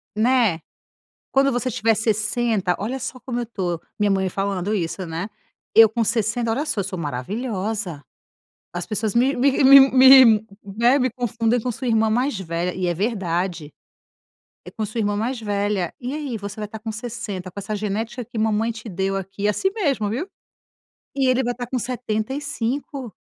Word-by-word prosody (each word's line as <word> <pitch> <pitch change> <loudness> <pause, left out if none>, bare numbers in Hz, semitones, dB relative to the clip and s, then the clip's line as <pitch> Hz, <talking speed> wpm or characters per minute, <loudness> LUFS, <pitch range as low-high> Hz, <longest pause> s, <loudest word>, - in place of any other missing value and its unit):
Né. 225 -6 +3 0.7
"Quando 275 0 +3
você 245 +1 -1
tiver 225 -1 +2
60, 215 -2 0
olha 235 +6 -3
só 255 0 -5
como 245 -1 -3
eu 240 - -4
tô." 180 -7 -3 0.2
Minha 210 -1 +2
mãe 190 -1 +1
falando 195 +1 -2
isso, 185 -1 -3
né: 165 +4 -4 0.5
"Eu 225 0 +9
com 230 +2 -1
60, 230 +2 0
olha 275 +7 -1
só, 215 -8 -1
sou 190 -1 -5
maravilhosa! 190 - -3 0.7
As 175 0 -3
pessoas 215 -1 -1
me 255 +4 +3
me 270 +3 +2
me 275 +1 +10 0.4
me, 220 -2 +4 0.2
né, 235 +7 +2
me 255 -1 +1
confundem 235 0 0
com 250 - -2
sua 255 +3 -5
irmã 225 -1 +3
mais 245 +1 0
velha". 170 0 -2
E 185 -1 -2
é 175 - 0
verdade, 180 -5 -2 0.9
"É, - - -10
com 220 - -3
sua 215 +3 -5
irmã 205 -1 0
mais 235 +3 -2
velha. 205 -3 -1
E 255 +2 -4
aí, 290 -6 -4
você 200 0 -7
vai 210 - -3
estar 220 +1 -9
com 220 +1 -5
60, 215 -5 -6
com 200 - -7
essa 210 +2 -4
genética 215 +4 -3
que 235 0 -10
mamãe 220 +1 +1
te 225 0 -9
deu 195 0 -2
aqui," 195 +1 -7
e - - +3
é - - +3
assim 380 - 0
mesmo, 275 - 0
viu. 260 - -3 0.9
"E 270 -1 +2
ele 255 +1 +2
vai 245 0 -1
estar 245 0 -5
com 255 +1 -2
75. 250 +2 -3
220 Hz, 185 wpm, -22 LUFS, 195-245 Hz, 0.9 s, me